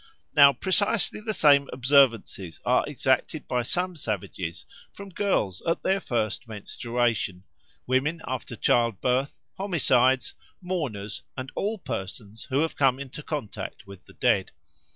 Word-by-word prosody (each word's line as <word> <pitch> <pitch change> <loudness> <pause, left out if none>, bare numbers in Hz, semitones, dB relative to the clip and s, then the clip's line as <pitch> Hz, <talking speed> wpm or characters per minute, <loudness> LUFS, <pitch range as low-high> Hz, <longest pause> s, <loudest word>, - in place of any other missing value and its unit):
Now 140 -1 +9
precisely 200 - +1
the 215 0 -2
same 145 -7 +4
observances 125 - +2
are - - +3
exacted - - 0
by 125 - 0
some 180 +8 -1
savages 95 - -4 0.3
from 200 0 -10
girls 170 - 0
at 165 - 0
their 190 +1 +2
first 115 - -2
menstruation, 110 -2 -2 0.4
women 135 +6 +1
after 130 -2 -4
childbirth, 120 +4 +1 0.2
homicides, 130 -9 +2 0.3
mourners, 130 - -4 0.2
and 130 0 -5
all 215 +3 -1
persons 105 - -7
who 135 +2 0
have 160 - -1
come 135 -2 +3
into 140 +1 -7
contact 145 -8 -6
with 100 -1 -13
the - - -16
dead. - - +2
130 Hz, 130 wpm, -26 LUFS, 110-165 Hz, 0.4 s, Now